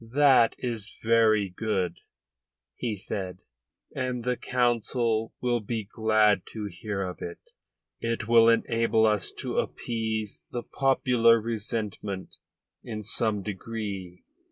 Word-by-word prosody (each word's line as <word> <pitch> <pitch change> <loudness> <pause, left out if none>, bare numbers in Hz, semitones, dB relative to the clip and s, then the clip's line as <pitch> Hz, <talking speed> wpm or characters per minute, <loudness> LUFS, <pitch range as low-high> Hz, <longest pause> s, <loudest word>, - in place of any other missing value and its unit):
"That 130 0 +4
is 115 -4 -4
very 110 -2 +4
good," 95 -6 -1 0.8
he 115 -4 -2
said, 95 -1 -4 0.6
"and 125 -2 -2
the 125 +1 +1
Council 120 -2 0
will 120 -1 +1
be 110 +1 -3
glad 110 -2 +3
to 110 -2 -4
hear 100 +1 -4
of 90 -1 -6
it. 85 - -5 0.6
It 115 -1 -2
will 115 -1 +7
enable 115 -1 +3
us 105 -3 +2
to - - -2
appease 110 -3 -3
the 120 - -4
popular 125 -4 +3
resentment 105 -3 -4 0.5
in 110 -2 -5
some 105 -1 -1
degree. 100 -3 -5
110 Hz, 115 wpm, -27 LUFS, 105-115 Hz, 0.8 s, will